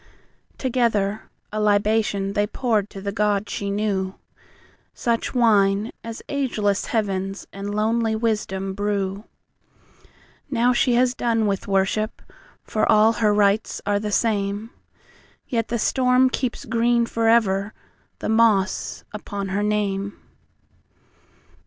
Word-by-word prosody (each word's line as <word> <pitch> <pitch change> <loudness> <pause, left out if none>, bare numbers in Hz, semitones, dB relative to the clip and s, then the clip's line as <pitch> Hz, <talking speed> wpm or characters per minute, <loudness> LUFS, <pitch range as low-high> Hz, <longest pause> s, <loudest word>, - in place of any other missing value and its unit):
Together 225 -5 0 0.2
a 215 - -1
libationThey 205 -1 +1
poured 215 -5 0
to 195 - -9
the 200 0 -3
God 210 -1 0
she 200 0 -3
knew, 200 -2 -1 0.8
Such 235 +2 -1
wine 210 -3 +3
as 230 0 -7
ageless 220 -8 -1
heavensAnd 195 -1 -3
lonely 220 +1 +1
wisdom 210 -4 -1
brew. 200 0 -2 1.2
Now 250 -1 +2
she 245 0 +2
has 250 0 +3
done 230 -3 0
with 200 -2 -1
worship, 195 +3 0 0.4
For 215 - -5
her - - +3
all 215 +1 +5
rites 210 -1 +2
are 205 0 +1
the 210 0 -3
same; 205 0 0 0.8
Yet 230 -3 -1
the 235 - -1
storm 255 +2 +3
keeps 255 -3 -3
green 235 0 +2
foreverThe 225 -4 +2 0.6
moss 220 -3 +2
upon 200 -2 -5
her 195 +2 -1
name. 200 -1 -1
210 Hz, 110 wpm, -23 LUFS, 200-230 Hz, 1.2 s, all